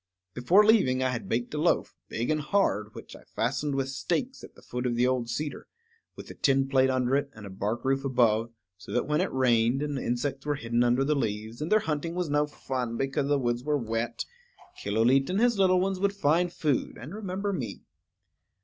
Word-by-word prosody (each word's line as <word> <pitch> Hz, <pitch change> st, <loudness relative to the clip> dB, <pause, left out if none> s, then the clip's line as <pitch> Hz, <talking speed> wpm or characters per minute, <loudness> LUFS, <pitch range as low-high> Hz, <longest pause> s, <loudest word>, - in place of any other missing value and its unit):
Before 175 Hz, +13 st, +4 dB
leaving 130 Hz, -, +4 dB
I 130 Hz, -, +2 dB
had 120 Hz, -2 st, -4 dB
baked 120 Hz, +4 st, -1 dB
a 150 Hz, -, -2 dB
loaf, -, -, +1 dB
big 120 Hz, +6 st, -2 dB
and 155 Hz, -1 st, 0 dB
hard, 125 Hz, -, 0 dB
which -, -, -10 dB
I -, -, -13 dB
fastened 135 Hz, +4 st, -2 dB
with 135 Hz, -1 st, 0 dB
stakes 170 Hz, -, -2 dB
at -, -, -12 dB
the -, -, -18 dB
foot 125 Hz, +1 st, -3 dB
of 120 Hz, -, -1 dB
the 120 Hz, +1 st, +3 dB
old 125 Hz, -2 st, 0 dB
cedar, 145 Hz, +5 st, -4 dB, 0.5 s
with -, -, -10 dB
a -, -, -8 dB
tin 135 Hz, -2 st, +2 dB
plate 130 Hz, -1 st, +3 dB
under 130 Hz, 0 st, +1 dB
it 140 Hz, 0 st, 0 dB
and 110 Hz, -1 st, -10 dB
a 100 Hz, -, -8 dB
bark 105 Hz, +6 st, -3 dB
roof 135 Hz, 0 st, +1 dB
above, 120 Hz, -4 st, +2 dB, 0.3 s
so -, -, -10 dB
that 125 Hz, -, +1 dB
when 150 Hz, +2 st, +1 dB
it 185 Hz, -, -1 dB
rained, 125 Hz, 0 st, +2 dB
and 145 Hz, -2 st, -2 dB
insects 135 Hz, +3 st, -2 dB
were 145 Hz, 0 st, -1 dB
hidden 120 Hz, -2 st, 0 dB
under 120 Hz, +2 st, +3 dB
the 150 Hz, +2 st, +2 dB
leaves, 110 Hz, -3 st, -3 dB
and 155 Hz, -, -3 dB
their 215 Hz, 0 st, +5 dB
hunting 160 Hz, +1 st, -3 dB
was 180 Hz, -4 st, -2 dB
no 145 Hz, 0 st, +2 dB
fun 125 Hz, -5 st, -4 dB
because 135 Hz, +1 st, -1 dB
the 145 Hz, 0 st, +2 dB
woods 120 Hz, -2 st, -1 dB
were 150 Hz, +1 st, +1 dB
wet, 115 Hz, -1 st, -3 dB, 0.5 s
Killooleet 120 Hz, +6 st, +2 dB
and 190 Hz, +2 st, 0 dB
his 235 Hz, -3 st, +3 dB
little 185 Hz, -1 st, +4 dB
ones 190 Hz, 0 st, -1 dB
would 200 Hz, +1 st, +1 dB
find 175 Hz, -1 st, +2 dB
food, 150 Hz, -6 st, -1 dB
and 135 Hz, +9 st, -9 dB
remember 200 Hz, -1 st, -3 dB
me. 120 Hz, -, -5 dB
135 Hz, 215 wpm, -28 LUFS, 120-155 Hz, 0.5 s, their